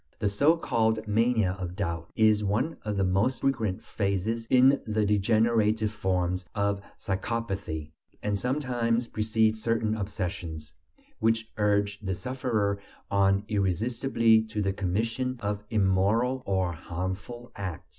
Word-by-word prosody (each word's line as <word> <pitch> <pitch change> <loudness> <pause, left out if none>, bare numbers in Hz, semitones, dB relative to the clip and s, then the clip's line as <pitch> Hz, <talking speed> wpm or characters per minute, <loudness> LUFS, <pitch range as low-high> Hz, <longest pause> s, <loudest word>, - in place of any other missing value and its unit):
The 105 -2 0
so 145 +12 +3
called 110 -6 0
"mania 110 -2 +2
of 90 -1 -5
doubt" 85 -4 -3
is 110 -1 +4
one 115 +11 0
of 105 -2 -2
the 95 - +2
most 100 +8 +1
frequent 115 -8 0
phases 110 +3 -1
in 130 +3 +5
the 110 -1 +1
degenerative 110 +1 +2
forms 90 -3 -1
of 100 -1 0 0.2
psychopathy, 95 -7 -3 0.3
and 105 -1 0
sometimes 125 -3 0
precedes 110 0 +1
certain 115 -1 +1
obsessions, 90 -7 -4 0.5
which 115 0 +1
urge 100 -1 +1
the 95 -3 -3
sufferer 110 -4 -1 0.3
on 100 0 +3
irresistibly 110 +3 +2
to 110 -1 -5
the 95 0 0
commission 115 +7 -1
of 105 -1 -3
immoral 110 +5 +2
or 95 -2 +1
harmful 95 +8 -5
acts. 95 -5 -5
105 Hz, 125 wpm, -28 LUFS, 95-115 Hz, 0.5 s, in